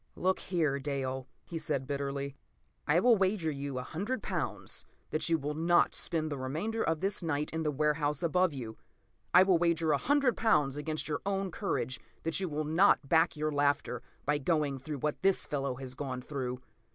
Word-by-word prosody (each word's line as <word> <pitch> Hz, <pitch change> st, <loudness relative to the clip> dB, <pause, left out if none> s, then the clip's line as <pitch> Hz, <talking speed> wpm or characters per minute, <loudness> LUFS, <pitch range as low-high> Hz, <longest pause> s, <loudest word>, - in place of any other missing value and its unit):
p> -, -, -14 dB
"Look 185 Hz, +1 st, +2 dB
here, 155 Hz, -6 st, 0 dB
Dale," 135 Hz, -2 st, -3 dB, 0.2 s
he 165 Hz, -, -5 dB
said 135 Hz, -4 st, -2 dB
bitterly, 140 Hz, 0 st, -3 dB, 0.5 s
"I 150 Hz, +4 st, +4 dB
will 235 Hz, +3 st, +5 dB
wager 190 Hz, -4 st, +1 dB
you 140 Hz, -2 st, -4 dB
a 125 Hz, -, -2 dB
hundred 205 Hz, -, -3 dB
pounds -, -, -2 dB, 0.3 s
that 155 Hz, +1 st, 0 dB
you 165 Hz, -, +4 dB
will 150 Hz, 0 st, -3 dB
not 170 Hz, +3 st, +3 dB
spend 155 Hz, -2 st, +1 dB
the 140 Hz, -, -3 dB
remainder 165 Hz, +13 st, -2 dB
of 165 Hz, -1 st, 0 dB
this 195 Hz, +1 st, -1 dB
night 150 Hz, -3 st, -1 dB
in 160 Hz, -, -1 dB
the 155 Hz, -, 0 dB
warehouse 150 Hz, +1 st, 0 dB
above 180 Hz, +2 st, +3 dB
you! 120 Hz, -6 st, -7 dB, 0.5 s
I 180 Hz, +1 st, +8 dB
will 185 Hz, -3 st, +4 dB
wager 170 Hz, -2 st, +2 dB
a 145 Hz, -, +4 dB
hundred 280 Hz, -3 st, +3 dB
pounds 145 Hz, -11 st, +2 dB
against 155 Hz, +1 st, -3 dB
your 150 Hz, -2 st, -2 dB
own 195 Hz, -1 st, -1 dB
courage 130 Hz, -, -2 dB, 0.2 s
that 165 Hz, +2 st, 0 dB
you 190 Hz, -2 st, -2 dB
will 155 Hz, 0 st, -2 dB
not 160 Hz, -1 st, +4 dB
back 165 Hz, +1 st, +3 dB
your 155 Hz, +1 st, 0 dB
laughter 145 Hz, -4 st, +1 dB, 0.2 s
by 145 Hz, 0 st, +1 dB
going 145 Hz, -2 st, 0 dB
through 145 Hz, +3 st, -5 dB
what 150 Hz, -1 st, -1 dB
this 195 Hz, 0 st, +3 dB
fellow 140 Hz, -3 st, -2 dB
has 130 Hz, 0 st, -7 dB
gone 130 Hz, -2 st, -4 dB
through. 125 Hz, -3 st, -4 dB
150 Hz, 195 wpm, -31 LUFS, 140-175 Hz, 0.5 s, I